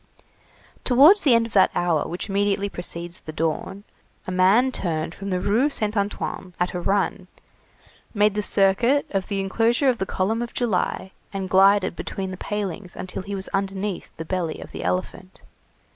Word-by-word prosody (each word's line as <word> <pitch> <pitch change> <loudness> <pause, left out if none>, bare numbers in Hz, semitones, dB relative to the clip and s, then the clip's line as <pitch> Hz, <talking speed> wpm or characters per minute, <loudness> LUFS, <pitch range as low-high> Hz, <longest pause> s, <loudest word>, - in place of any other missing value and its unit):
Towards 290 +11 +6
the 260 -6 +5
end 230 0 +3
of 230 - -9
that 190 - +5
hour 170 -4 +1
which 175 +5 -5
immediately 200 0 0
precedes 175 -1 -5
the 155 - -8
dawn, 165 +5 -3 0.4
a 185 - -4
man 195 +8 +4
turned 165 -7 -2
from 200 +2 -7
the 185 -1 0
Rue 225 +10 +2
Saint 215 -6 -2
Antoine 200 -3 -3
at 180 0 0
a 180 - -2
run, 195 0 0 0.8
made 210 -1 +3
the 210 - -1
circuit 205 +8 +3
of 195 -2 -1
the 200 -2 -2
enclosure 230 +7 +2
of 245 - 0
the 190 - -2
column 220 +5 -1
of 240 - -6
July, 195 -4 -1 0.2
and 190 -2 -4
glided 195 -1 +4
between 190 +1 -5
the 185 - -6
palings 200 -2 -4
until 185 - -5
he 200 +1 -5
was 190 -1 -4
underneath 195 0 -3
the 160 - -6
belly 170 -2 -2
of - - -10
the - - -6
elephant. 185 0 -4
195 Hz, 175 wpm, -23 LUFS, 185-210 Hz, 0.8 s, Towards